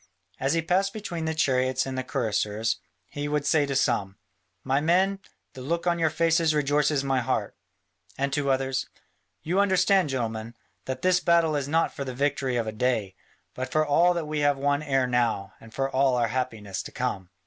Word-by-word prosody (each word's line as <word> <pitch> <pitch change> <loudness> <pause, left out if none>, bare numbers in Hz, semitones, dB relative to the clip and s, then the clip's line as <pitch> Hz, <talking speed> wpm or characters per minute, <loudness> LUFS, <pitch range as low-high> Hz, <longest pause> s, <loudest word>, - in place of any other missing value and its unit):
As 135 +3 +1
he 165 -1 +1
passed 190 +4 +1
between 175 -6 -5
the 160 0 -1
chariots 130 -3 +1
and 135 -1 -4
the 130 - -2
cuirassiers, 110 -3 -1 0.3
he 145 +6 -5
would 150 -1 -1
say 145 0 +3
to 140 - -2
some, 100 -7 0 0.5
"My 135 +1 +1
men, 190 +5 +2 0.3
the 130 - -9
look 170 +7 -2
on 170 -1 +1
your 160 -1 +3
faces 165 0 +2
rejoices 145 -1 +2
my 135 -1 +1
heart," 115 -4 -2 0.6
and 140 0 -1
to 145 -1 0
others, 135 0 0 0.6
"You 180 +5 0
understand, 190 -3 +3
gentlemen, 115 -3 -3 0.3
that 130 0 -5
this 185 -1 +4
battle 170 -3 +3
is 140 -2 -1
not 165 +3 +1
for 140 - -4
the 130 -2 -6
victory 140 -1 0
of 115 -2 0
a 110 - -3
day, 110 -4 -1 0.4
but 130 0 -5
for 155 0 +2
all 170 +5 +4
that 170 -2 -2
we 150 0 -3
have 145 -1 +2
won 145 +1 +1
ere 135 -4 +1
now, 120 -5 0
and 115 - -14
for 135 +3 -1
all 135 -1 +2
our 120 -2 +1
happiness 110 -6 -3
to - - -9
come." 95 -2 -3
140 Hz, 195 wpm, -26 LUFS, 125-160 Hz, 0.6 s, this